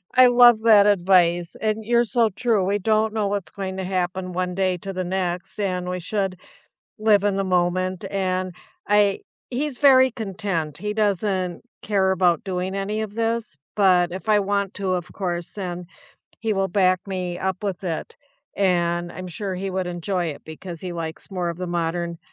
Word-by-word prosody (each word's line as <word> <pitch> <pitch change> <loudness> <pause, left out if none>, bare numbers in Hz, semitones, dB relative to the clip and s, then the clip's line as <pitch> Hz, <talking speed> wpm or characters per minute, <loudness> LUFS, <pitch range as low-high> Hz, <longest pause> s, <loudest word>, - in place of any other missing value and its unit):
I 255 0 +8
love 240 -2 +7
that 210 -3 +7
advice. 175 -3 +3
And 215 0 -1
you're 235 +1 +3
so 230 +1 +2
true. 220 -1 +1
We 200 +2 +1
don't 215 +1 +1
know 215 -2 0
what's 200 -2 -3
going 190 -2 -5
to 190 - -3
happen 185 0 -2
one 180 0 -2
day 185 -1 +1
to 195 +3 -6
the 185 -1 -3
next, 180 +1 -3
and 180 -2 -1
we 180 0 -3
should 190 0 -2 0.6
live 210 -2 +4
in 200 -1 +1
the 195 - 0
moment. 185 +1 0
And 185 -2 -1 0.3
I 205 -1 +3 0.3
he's 265 +1 -2
very 260 -2 +6
content. 195 - -3
He 210 0 -3
doesn't 195 -4 0 0.2
care 195 -2 +1
about 180 -2 +2
doing 185 0 -3
any 200 +2 -2
of 210 -1 -6
this. 230 -6 -1 0.2
But 180 -4 +4
if 190 +4 -7
I 210 -1 +5
want 200 -1 -1
to, 195 -2 -2
of 175 -3 -3
course, 175 -3 -3
then 180 -3 -5 0.5
he 225 -1 0
will 195 -1 0
back 185 -1 +3
me 180 -2 -3
up 190 +1 -2
with 195 -2 -3
it. 165 -3 -4 0.4
And 175 -2 +1
I'm 185 0 -7
sure 190 +2 -4
he 190 +1 -3
would 185 -1 -2
enjoy 175 +1 -2
it 150 -3 -6
because 165 +1 -8
he 180 -1 -5
likes 165 +1 -6
more 180 -3 -2
of 170 +1 -5
the 180 - -3
modern 170 0 -2
190 Hz, 185 wpm, -23 LUFS, 180-205 Hz, 0.6 s, I